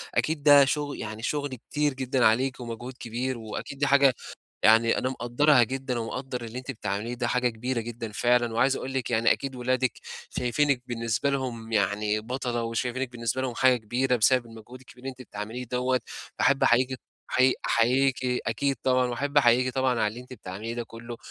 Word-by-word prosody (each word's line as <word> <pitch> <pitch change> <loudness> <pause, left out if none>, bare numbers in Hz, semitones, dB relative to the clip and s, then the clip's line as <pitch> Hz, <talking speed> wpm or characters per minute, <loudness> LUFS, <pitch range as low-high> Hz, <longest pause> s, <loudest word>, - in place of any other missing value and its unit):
أكيد 155 -2 0
ده 145 -1 +8
شُغ 145 +1 -2
يعني 110 0 -6
شُغل 145 0 -2
كتير 150 -1 +1
جدًا 130 -1 0
عليكِ 130 +4 +2
ومجهود 120 +1 -6
كبير 125 +2 -3
وأكيد 110 +4 -7
دي 145 - +2
حاجة 140 -1 +5 0.5
يعني 115 +1 +5
أنا 130 - 0
مقدّرها 130 +2 +3
جدًا 130 +1 -2
ومقدّر 125 +2 -4
اللي 115 +2 -6
أنتِ 130 +1 -6
بتعمليه، 105 0 -3
ده 120 0 -2
حاجة 125 0 +2
كبيرة 120 +2 -3
جدًا 115 -1 -6
فعلًا 120 +1 +2
وعايز 135 +4 +3
أقول 135 - -5
لِك 130 -3 -2
يعني 115 0 +4
أكيد 135 -1 -5
ولادِك 125 0 0 0.4
شايفينِك 130 +1 +1
بالنسبة 115 +2 -1
لهم 120 -5 -4
يعني 105 +1 +1
بَطلة 120 +1 -3
وشايفينِك 125 +2 -2
بالنسبة 115 +1 -2
لهم 130 -2 -2
حاجة 130 0 +4
كبيرة 125 +3 0
بسبب 120 +2 +3
المجهود 115 +2 -12
الكبير 130 -1 -17
اللي 135 - -3
أنتِ 130 0 -11
بتعمليه 110 +2 -6
دوّة. 125 +1 0 0.4
باحب 135 0 +3
أحييكِ 125 +2 +3 0.4
أحيي 130 0 +4
أحييكِ 130 +3 +3 0.3
أكيد 135 +5 0
طبعًا 130 -1 +3
واحب 140 +4 -3
أحييكِ 125 -1 +3
طبعًا 130 -1 +2
على - - +3
اللي 115 +4 -8
أنتِ 125 +1 -13
بتعمليه 110 0 -6
ده 120 - -3
كُلّه 115 +1 -9
125 Hz, 180 wpm, -27 LUFS, 115-130 Hz, 0.5 s, ده